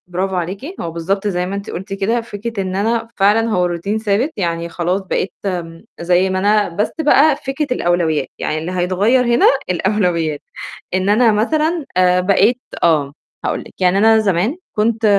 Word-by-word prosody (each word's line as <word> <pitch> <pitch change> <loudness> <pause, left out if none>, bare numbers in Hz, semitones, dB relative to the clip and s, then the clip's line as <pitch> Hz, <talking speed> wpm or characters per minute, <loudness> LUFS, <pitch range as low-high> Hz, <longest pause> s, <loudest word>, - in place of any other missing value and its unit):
برافو 185 +2 -2
عليكِ، 195 - -4
هو 165 - -4
بالضبط 195 +5 -2
زي 180 -3 -1
ما 190 +2 -4
أنتِ 200 0 -6
قُلتِ، 195 +3 -6
كده 215 +5 0
فكرة 225 -1 -5
إن 185 -1 -3
أنا 225 +3 0
فعلًا 210 +3 +3
هو 180 -4 +1
routine 200 +6 -2
ثابت، 220 +8 +1
يعني 170 -3 -2
خلاص 175 +3 -1
بقيت 190 0 -2
م 170 -3 -4 0.2
زي 180 +2 +2
ما 185 0 -1
أنا، 205 +1 +2
بس 205 +5 -1
بقى 300 0 +5
فكرة 275 +2 -3
الأولويّات، 170 - +1
يعني 155 - -2
اللي 160 +3 -4
هيتغيّر 190 +8 +2
هنا 240 0 +3 0.2
الأولويّات. 180 -5 0 0.5
إن 185 +1 +1
أنا 225 +2 +4
مثلًا 310 +9 0
آآ، 180 0 +4
بقيت 205 +6 +3 0.2
آه، 150 -4 +2 0.3
هاقول - - -1
لِك. - - -12
يعني 180 +1 +3
أنا 220 +2 +5
زمان 205 - +1 0.2
كنت 225 +1 0
195 Hz, 175 wpm, -18 LUFS, 180-225 Hz, 0.5 s, بقى